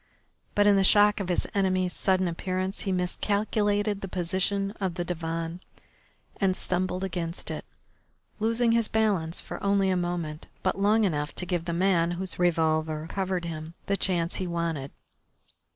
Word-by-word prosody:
But 205 - +4
in 205 -1 +6
the 195 - +4
shock 205 +2 +5
of 190 -2 -3
his 180 - +1
enemy's 185 -2 +1
sudden 185 -1 +2
appearance 185 +3 -2
he 195 - -1
miscalculated 205 +2 0
the 195 - -4
position 190 +2 0
of 185 -3 -1
the 175 -1 -2
divan 165 0 -3 0.8
and 190 -2 +1
stumbled 185 0 -1
against 170 -2 -3
it, - - -5 0.7
losing 230 +2 +2
his 230 -1 +3
balance 200 -7 +1
for - - -7
only 200 -1 +3
a - - +2
moment, 175 -3 -3 0.2
but 190 +1 0
long 215 +3 +4
enough 150 -6 -1
to 180 - -3
give 175 -2 -1
the 170 - -2
man 170 -1 +3
whose 185 -1 -5
revolver 160 -2 +1
covered 190 -2 -1
him 160 0 -6
the 200 - +1
chance 175 -3 0
he 185 - -2
wanted. 165 -5 -2
185 Hz, 160 wpm, -27 LUFS, 170-200 Hz, 0.8 s, in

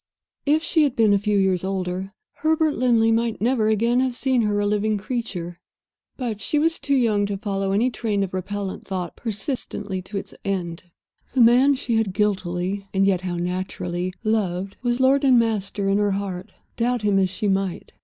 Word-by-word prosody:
If 310 +2 +3
she 325 - +2
had 285 -4 +2
been 220 -4 +4
a 200 - +3
few 205 0 +1
years 190 -2 +2
older, 190 0 -3 0.2
Herbert 315 0 +2
Linley 230 -3 +3
might 230 0 0
never 230 -1 +2
again 230 +3 +2
have 255 -1 0
seen 255 0 +1
her 210 -2 +1
a 205 - +1
living 210 +1 +1
creature. 195 -6 -4 0.6
But 230 -5 -3
she 300 - 0
was 325 +2 +2
too 280 - +1
young 215 -5 +2
to 200 -1 -3
follow 195 -1 -2
any 230 +6 +2
train 210 -4 -1
of 190 - -5
repellent 195 +1 -4
thought 185 -3 -4
persistently 205 -3 -4
to 190 +3 -6
its 195 - -6
end. 180 -3 -3 0.5
The 255 - +3
man 250 +4 +6
she 240 -3 -1
had 215 -4 0
guiltily 195 -1 -1
(and 195 0 +4
yet 190 -2 +2
how 180 -1 -3
naturally) 180 0 -3
loved 195 -3 -1
was 240 0 0
lord 270 +2 +4
and 260 -3 +6
master 210 -3 0
in 195 +1 +2
her 205 -1 +2
heart, 190 -2 -4 0.3
doubt 240 -1 0
him 205 -2 +3
as 190 -1 +2
she 205 +3 -2
might. 195 -2 -1
205 Hz, 190 wpm, -23 LUFS, 190-240 Hz, 0.6 s, man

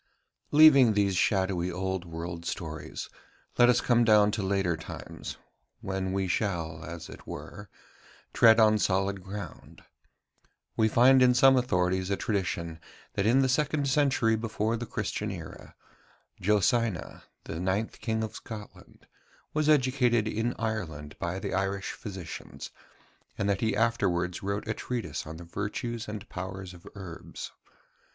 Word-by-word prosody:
Leaving 140 -6 +7
these 100 -2 +2
shadowy 95 -1 +1
old 95 0 -3
world 85 0 -6
stories, 80 -3 -5 0.5
let 120 0 +7
us 120 0 +4
come 120 -1 +3
down 105 -2 +5
to 105 - -2
later 95 -3 +1
times, 80 - -8 0.4
when 95 -1 -2
we 95 0 0
shall, 85 -5 -2
as 85 0 -7
it - - -12
were, 105 -2 -8 0.6
tread 115 -1 +6
on 110 -1 +5
solid 95 0 0
ground. 100 +1 -9 0.9
We 110 - +3
find 130 +4 +6
in 125 -1 +5
some 135 +2 +7
authorities 95 -6 +1
a 100 - 0
tradition 85 -5 -2 0.3
that 100 - 0
in 130 +4 +5
the - - +3
second 145 +2 +1
century 135 -5 +3
before 110 0 -1
the 120 +1 -5
Christian 105 0 -3
era, 85 -6 -9 0.6
Josina, 105 0 +1 0.2
the 80 - -6
ninth 95 +5 -1
king 110 -1 -1
of 110 -1 -4
Scotland, 110 -2 -10 0.5
was 155 0 +1
educated 125 -5 +3
in 115 +3 -1
Ireland 80 -10 -4
by 85 +2 -2
the 95 - -4
Irish 95 +1 -1
physicians, 95 -6 -8 0.7
and 100 - 0
that 100 -1 0
he 110 - +1
afterwards 95 -6 +1
wrote 100 +2 -3
a 110 - 0
treatise 95 - -4
on 80 +1 -7
the 85 - -9
virtues 105 +6 -4
and 105 0 -6
powers 95 0 -6
of 85 -1 -14
herbs. 95 -4 -8
100 Hz, 145 wpm, -28 LUFS, 90-115 Hz, 0.9 s, Leaving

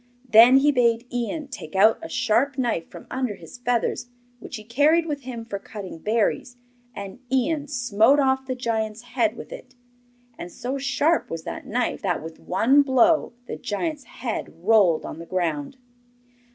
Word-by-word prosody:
Then 235 +3 +8
he 290 +2 +4
bade 235 -2 +2
Ian 265 +5 -3
take 155 -11 -9
out 215 +3 +5
a - - -7
sharp 250 +5 +1
knife 235 -10 -1
from - - -11
under 255 -5 -2
his 170 +8 -13
feathers, 245 0 -1 0.3
which - - -8
he 215 - -8
carried 290 +9 +3
with 295 -3 -4
him 240 -3 -7
for 200 -3 -5
cutting 195 -5 -9
berries, 230 +4 -1 0.4
and 200 +2 -8
Ian 290 +3 0
smote 245 0 +3
off 265 -1 +1
the 255 - -2
giant's 225 -2 -2
head 235 -2 0
with - - -9
it. 255 0 -12 0.6
And 175 - -7
so 260 +8 -4
sharp 285 +4 +1
was 165 -1 -5
that - - -7
knife 245 +3 -1
that, 180 -6 -1
with 160 0 -9
one 240 +10 +3
blow, 275 +2 +3
the - - -6
giant's 285 +6 -3
head 235 -1 -5
rolled 195 -6 +4
on - - -7
the 170 - -9
ground. 165 - -2
240 Hz, 170 wpm, -24 LUFS, 210-265 Hz, 0.6 s, Then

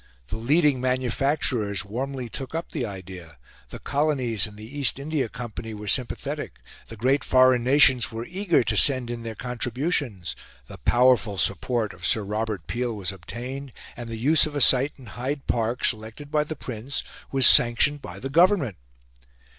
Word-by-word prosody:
The - - -4
leading 140 +3 +2
manufacturers 125 -5 0
warmly 130 +4 -5
took 135 +6 -7
up 165 - -5
the 120 - -3
idea; 95 -5 -10 0.3
the - - -8
colonies 130 -8 0
and 105 -1 -14
the 105 - -9
East 140 - +3
India 140 -3 -2
Company 110 +1 -7
were 105 0 -9
sympathetic; 125 +4 -2 0.3
the 115 - -9
great 130 +6 +1
foreign 130 -1 +4
nations 130 -2 +4
were 115 +1 -6
eager 185 +1 +1
to - - -1
send 130 -4 +4
in 120 -1 -5
their 115 -1 -7
contributions; 125 - -2 0.3
the - - -12
powerful 120 -4 +2
support 110 +2 0
of - - -16
Sir 110 - +3
Robert 105 -3 -4
Peel 120 -1 -3
was 95 -2 -2
obtained, 120 +8 -8 0.2
and 120 -1 -8
the 115 - -5
use 150 +7 +4
of 150 - -8
a - - 0
site 135 +2 +4
in 130 - -14
Hyde 130 +6 -5
Park, 115 +1 -1
selected 110 +6 -3
by 150 -1 +1
the 155 - -6
Prince, 125 -1 -5 0.3
was 135 -2 +4
sanctioned 125 +5 +6
by 90 -5 -9
the 135 +6 -6
Government. 170 - +3
125 Hz, 170 wpm, -24 LUFS, 110-140 Hz, 0.3 s, sanctioned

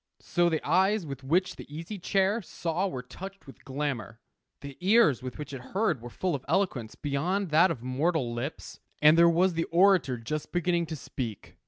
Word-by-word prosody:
So 175 -1 +1
the 160 -3 -2
eyes 190 +4 +3
with 135 -2 -7
which 180 +6 +1
the - - -11
Easy 165 +7 -6
Chair 195 +4 +1
saw 175 0 -2
were 130 -9 -5
touched 195 +9 -10
with 135 - -14
glamour. 130 -6 -4 0.4
The 140 -1 -8
ears 185 - +4
with 130 -1 -7
which 150 -2 -7
it 135 - -6
heard 180 - -1
were 120 - -8
full 180 +8 -2
of 135 -3 -3
eloquence 150 - 0
beyond 165 +6 -1
that 165 +5 +6
of 130 -8 -4
mortal 130 0 0
lips. 125 +6 -6 0.2
And 150 +1 +7
there 170 0 +6
was 180 +2 +3
the 165 0 -1
orator 175 -7 +3
just 145 +7 -5
beginning 175 -1 0
to 160 - -4
speak. 120 -7 -6
160 Hz, 190 wpm, -28 LUFS, 135-185 Hz, 0.4 s, And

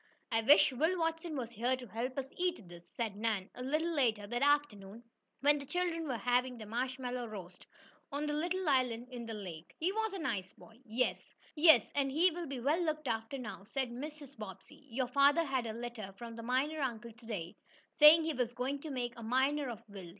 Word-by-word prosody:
"I 225 0 +3
wish 280 +4 +7
Will 320 +8 +1
Watson 325 -1 -1
was 240 -3 -4
here 240 +3 +1
to 250 - -8
help 240 +5 -4
us 270 - -1
eat 350 - -1
these," 175 0 -13
said 225 -4 -3
Nan 210 -3 -1
a 250 - -9
little 310 +6 0
later 230 -8 +1
that 240 +4 -3
afternoon, 235 -7 +1 0.4
when 290 +1 +4
the 280 - -8
children 340 -2 -1
were 255 -4 -1
having 245 +2 +1
their 220 - -8
marshmallow 250 +2 -3
roast 185 -4 -9 0.4
on 290 +2 -2
a 295 - -1
little 350 +4 -1
island 250 -3 +1
in 240 -2 -6
the 225 - -4
lake. 175 -6 -8
"He 345 +4 +1
was 440 +1 -1
a - - -3
nice 220 - -3
boy." 225 +1 -17
"Yes, 235 +2 -1 0.6
and 275 -1 +1
he 340 +6 +4
will 340 0 -5
be 270 -2 -4
well 295 +8 +2
looked 310 -3 -2
after 225 +3 -2
now," 230 -6 -7
said 260 +2 -2
Mrs. 285 +2 -8
Bobbsey. 215 - -10
"Your 255 +2 0
father 280 +5 +4
had 260 -4 -1
a - - -2
letter 235 -4 -6
from 230 0 -8
the 230 - -7
miner 260 +6 0
uncle 235 -3 -3
to 225 +1 -18
day, 180 -7 -4 0.4
saying 310 +2 +9
he 320 0 -1
was 245 -2 -1
going 260 +3 -2
to 310 - -7
make 245 -3 -2
a - - -8
miner 265 +4 +1
of 230 -1 -7
Will. 195 -4 -9
255 Hz, 210 wpm, -34 LUFS, 225-295 Hz, 0.6 s, saying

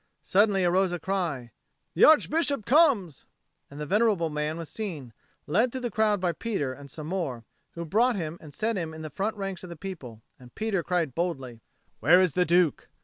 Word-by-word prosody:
Suddenly 195 -1 +3
arose 185 +1 +2
a 175 - -2
cry, 160 -9 -3 0.4
"The - - +6
Archbishop 310 -5 +3
comes!" 245 - +3 0.4
and 140 - -11
the 150 - -3
venerable 195 -3 +2
man 150 +1 -2
was 165 -2 -6
seen, 155 - -6 0.3
led 220 +11 +2
through 260 - -5
the 240 -2 -3
crowd 210 -1 +2
by 180 -1 +1
Peter 170 - -3
and 140 +1 -12
some 150 +2 -8
more, 155 -9 -3 0.3
who 170 0 -6
brought 230 +9 +2
him 165 -3 -4
and 155 - -11
set 220 +9 -1
him 160 -3 -4
in 160 - -8
the 155 - -7
front 210 +2 -2
ranks 195 -2 -5
of 180 - -8
the 170 - -7
people; 140 - -8 0.2
and 125 -1 -16
Peter 215 -4 -1
cried 170 -5 -1
boldly, 135 -8 -3 0.4
"Where 165 +10 +6
is 185 -3 +3
the 180 +4 +1
Duke?" 175 -3 +2
175 Hz, 200 wpm, -27 LUFS, 150-205 Hz, 0.4 s, The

